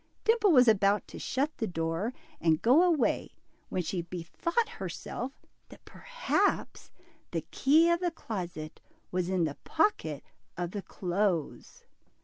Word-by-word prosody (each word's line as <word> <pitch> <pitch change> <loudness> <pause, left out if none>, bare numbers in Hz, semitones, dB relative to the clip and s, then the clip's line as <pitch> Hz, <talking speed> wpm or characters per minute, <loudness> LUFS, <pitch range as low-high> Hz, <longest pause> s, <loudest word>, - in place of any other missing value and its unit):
Dimple 445 -3 +4
was 250 -5 +6
about 205 -1 +3
to - - -9
shut 280 +4 -1
the 225 - -1
door 165 +5 -2 0.3
and 160 -2 +3
go 255 - +5
away, 345 -5 +1 0.3
when 180 - -1
she 175 +2 -2
bethought 180 - -2
herself 275 - -6 0.2
that - - -15
perhaps - - -1 0.4
the - - -2
key 315 +5 +4
of 340 - +2
the 355 -1 +1
closet 180 - -6 0.3
was 180 -1 -1
in 185 -2 +1
the 150 -3 -2
pocket 165 - 0 0.3
of 175 -1 -3
the 205 - -4
clothes. 185 -3 -2
205 Hz, 135 wpm, -30 LUFS, -, 0.4 s, was